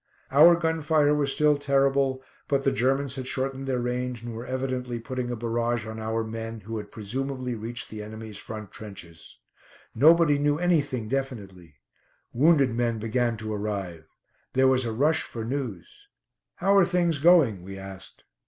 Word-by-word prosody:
Our 160 Hz, +5 st, +8 dB
gun 160 Hz, -1 st, -1 dB
fire 150 Hz, -1 st, +3 dB
was 145 Hz, -2 st, +1 dB
still 150 Hz, 0 st, +3 dB
terrible, 135 Hz, -1 st, +1 dB, 0.2 s
but 140 Hz, -1 st, +1 dB
the 135 Hz, -, +3 dB
Germans 135 Hz, +3 st, 0 dB
had 130 Hz, -1 st, -5 dB
shortened 135 Hz, +1 st, -3 dB
their 130 Hz, -1 st, 0 dB
range 125 Hz, -1 st, -3 dB
and 120 Hz, -1 st, -6 dB
were 115 Hz, +2 st, -7 dB
evidently 130 Hz, -2 st, -3 dB
putting 125 Hz, +2 st, -4 dB
a 120 Hz, -, -2 dB
barrage 115 Hz, 0 st, -1 dB
on 110 Hz, 0 st, -7 dB
our 110 Hz, +1 st, -1 dB
men, 115 Hz, 0 st, -6 dB
who 110 Hz, +2 st, -5 dB
had 105 Hz, -, -9 dB
presumably 130 Hz, +4 st, -4 dB
reached 115 Hz, +1 st, -6 dB
the 110 Hz, -1 st, -6 dB
enemy's 110 Hz, 0 st, -8 dB
front 110 Hz, -2 st, -8 dB
trenches. 90 Hz, -6 st, -10 dB, 0.6 s
Nobody 155 Hz, +3 st, +5 dB
knew 145 Hz, 0 st, +2 dB
anything 145 Hz, -9 st, 0 dB
definitely. 100 Hz, -, -5 dB, 0.6 s
Wounded 140 Hz, -1 st, +4 dB
men 120 Hz, -1 st, 0 dB
began 115 Hz, +1 st, 0 dB
to 110 Hz, 0 st, -5 dB
arrive. 100 Hz, -6 st, -4 dB, 0.5 s
There 130 Hz, 0 st, +4 dB
was 130 Hz, -1 st, +3 dB
a 115 Hz, -, -2 dB
rush 150 Hz, +8 st, +2 dB
for 115 Hz, -1 st, -5 dB
news. 145 Hz, -, -5 dB, 0.5 s
"How 195 Hz, +2 st, +2 dB
are 195 Hz, -, +7 dB
things 175 Hz, -3 st, +1 dB
going?" 145 Hz, -, +5 dB
we 95 Hz, +2 st, -9 dB
asked. 95 Hz, -1 st, -11 dB
125 Hz, 165 wpm, -26 LUFS, 110-140 Hz, 0.6 s, Our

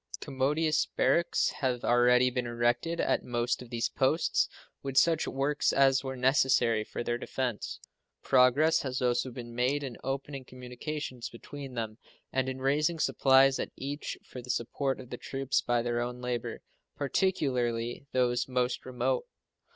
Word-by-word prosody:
Commodious 150 Hz, +3 st, +1 dB
barracks 170 Hz, -, +2 dB
have 125 Hz, -3 st, -1 dB
already 125 Hz, +1 st, +4 dB
been 125 Hz, -1 st, -2 dB
erected 120 Hz, +8 st, 0 dB
at -, -, +1 dB
most 120 Hz, 0 st, -1 dB
of 125 Hz, -, -10 dB
these 115 Hz, -1 st, 0 dB
posts, 150 Hz, +5 st, +1 dB, 0.3 s
with 135 Hz, -1 st, -4 dB
such 165 Hz, +2 st, +4 dB
works 140 Hz, +2 st, +1 dB
as 135 Hz, -1 st, +4 dB
were 130 Hz, -1 st, -4 dB
necessary 125 Hz, -4 st, +3 dB
for 115 Hz, -, -5 dB
their 120 Hz, 0 st, -1 dB
defense. 125 Hz, -4 st, -3 dB, 0.4 s
Progress 130 Hz, +5 st, +4 dB
has 130 Hz, -2 st, -3 dB
also 125 Hz, 0 st, +1 dB
been 120 Hz, -1 st, -8 dB
made 130 Hz, +4 st, +1 dB
in 130 Hz, -4 st, -6 dB
opening 135 Hz, 0 st, -4 dB
communications 125 Hz, +1 st, -6 dB
between 135 Hz, +2 st, -9 dB
them 110 Hz, -1 st, -4 dB, 0.3 s
and 130 Hz, 0 st, +1 dB
in 130 Hz, -, -4 dB
raising 150 Hz, +5 st, +1 dB
supplies 135 Hz, -3 st, +4 dB
at -, -, -2 dB
each 145 Hz, +2 st, -5 dB
for 125 Hz, -, -9 dB
the 125 Hz, -, -13 dB
support 135 Hz, +3 st, -1 dB
of 125 Hz, -1 st, -11 dB
the -, -, -4 dB
troops 135 Hz, 0 st, -1 dB
by 120 Hz, -1 st, +1 dB
their 120 Hz, 0 st, 0 dB
own 125 Hz, +1 st, -4 dB
labor, 125 Hz, -1 st, -4 dB, 0.3 s
particularly 125 Hz, -6 st, 0 dB
those 125 Hz, -1 st, +1 dB
most 125 Hz, -1 st, -1 dB
remote. 125 Hz, 0 st, -1 dB
130 Hz, 150 wpm, -30 LUFS, 120-135 Hz, 0.4 s, already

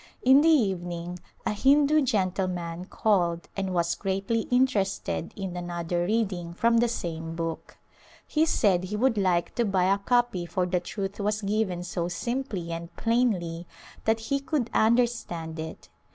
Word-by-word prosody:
In 265 Hz, +3 st, +7 dB
the 325 Hz, -, +4 dB
evening 180 Hz, -, 0 dB, 0.3 s
a -, -, +1 dB
Hindu 285 Hz, +6 st, +4 dB
gentleman 185 Hz, -6 st, -1 dB
called 175 Hz, -5 st, +1 dB
and 195 Hz, -1 st, -2 dB
was 170 Hz, -1 st, +1 dB
greatly 195 Hz, +3 st, -1 dB
interested 210 Hz, -9 st, +1 dB
in 190 Hz, -3 st, -5 dB
another 175 Hz, 0 st, -2 dB
reading 190 Hz, -6 st, -1 dB
from 230 Hz, +4 st, +3 dB
the 240 Hz, -, +3 dB
same 165 Hz, -7 st, -4 dB
book. 165 Hz, -1 st, -5 dB, 0.5 s
He 315 Hz, +1 st, +1 dB
said 185 Hz, -, +2 dB
he 205 Hz, +3 st, -4 dB
would 240 Hz, +2 st, +2 dB
like 185 Hz, -4 st, +1 dB
to 240 Hz, -, +1 dB
buy 190 Hz, -2 st, +2 dB
a 200 Hz, -, -1 dB
copy 240 Hz, -5 st, +1 dB
for 185 Hz, 0 st, 0 dB
the 180 Hz, 0 st, 0 dB
truth 195 Hz, +2 st, -5 dB
was 210 Hz, +1 st, -1 dB
given 195 Hz, -3 st, 0 dB
so 175 Hz, -1 st, -2 dB
simply 195 Hz, -2 st, -3 dB
and 170 Hz, +1 st, -5 dB
plainly 185 Hz, -8 st, 0 dB, 0.4 s
that 220 Hz, 0 st, +2 dB
he 275 Hz, +5 st, -1 dB
could 275 Hz, -4 st, -2 dB
understand 220 Hz, -9 st, +1 dB
it. 160 Hz, 0 st, -7 dB
195 Hz, 150 wpm, -27 LUFS, 175-230 Hz, 0.5 s, In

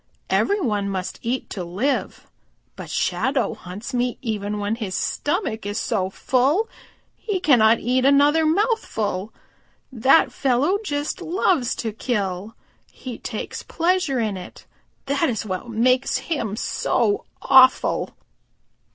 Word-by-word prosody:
Every 405 Hz, +1 st, +2 dB
one 210 Hz, -, -1 dB
must 185 Hz, -2 st, -4 dB
eat 245 Hz, +3 st, -2 dB
to 185 Hz, -, -4 dB
live. 200 Hz, +12 st, -2 dB, 0.5 s
But -, -, -9 dB
Shadow 265 Hz, -1 st, 0 dB
hunts 200 Hz, +9 st, -8 dB
me 245 Hz, 0 st, 0 dB
even 210 Hz, -3 st, -2 dB
when 205 Hz, +1 st, -1 dB
his 200 Hz, -5 st, -4 dB
stomach 290 Hz, -, -1 dB
is 205 Hz, +1 st, -3 dB
so 195 Hz, -7 st, -1 dB
full 270 Hz, -, +1 dB, 0.5 s
he 410 Hz, -4 st, -3 dB
cannot 235 Hz, -9 st, +5 dB
eat 255 Hz, +2 st, +1 dB
another 285 Hz, +3 st, +5 dB
mouthful. 310 Hz, -, 0 dB, 0.6 s
That 260 Hz, +5 st, +4 dB
fellow 280 Hz, +9 st, +1 dB
just 290 Hz, -6 st, -3 dB
loves 335 Hz, -7 st, +1 dB
to 225 Hz, -, -3 dB
kill. 205 Hz, -3 st, -3 dB, 0.4 s
He 250 Hz, -3 st, -8 dB
takes 220 Hz, -, -5 dB
pleasure 345 Hz, -6 st, 0 dB
in 215 Hz, -4 st, -1 dB
it. 180 Hz, -, -11 dB, 0.4 s
That 280 Hz, +3 st, +1 dB
is 220 Hz, -4 st, -2 dB
what 190 Hz, +3 st, -4 dB
makes 255 Hz, +3 st, +2 dB
him 230 Hz, -11 st, -3 dB
so 410 Hz, -, 0 dB
awful." 260 Hz, -1 st, +4 dB
245 Hz, 125 wpm, -22 LUFS, 210-290 Hz, 0.6 s, cannot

